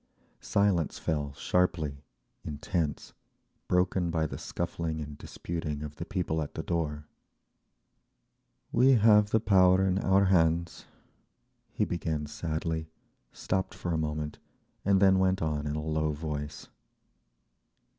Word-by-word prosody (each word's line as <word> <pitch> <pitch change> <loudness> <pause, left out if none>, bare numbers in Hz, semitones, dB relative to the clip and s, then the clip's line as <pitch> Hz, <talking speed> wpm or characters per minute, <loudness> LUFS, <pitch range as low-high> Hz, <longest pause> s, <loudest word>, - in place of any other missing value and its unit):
Silence 100 -6 +1
fell 75 -2 -2
sharply, 75 -3 0 0.4
intense, 75 0 -3 0.5
broken 90 -1 +1
by 80 -1 0
the - - -4
scuffling 80 -2 -3
and 75 -1 -6
disputing 75 -3 -5
of 75 -1 -8
the 85 - -5
people 90 -6 -1
at 75 - -6
the 80 - -3
door…. 75 -3 -2 1.7
"We 130 +3 +5
have 105 -3 +5
the 110 - +3
power 95 -2 +5
in 95 0 +1
our 100 0 +3
hands," 85 -3 +2 0.8
he - - 0
began 80 -3 -2
sadly, 80 +1 -3 0.4
stopped 95 0 -2
for 90 - -3
a - - +1
moment, 75 -1 -3 0.4
and 100 -1 +3
then 95 -1 +5
went 95 0 +2
on 75 -2 -1
in 75 - -2
a 75 - -3
low 80 -1 0
voice. 75 -1 -5
80 Hz, 125 wpm, -29 LUFS, 75-95 Hz, 1.7 s, We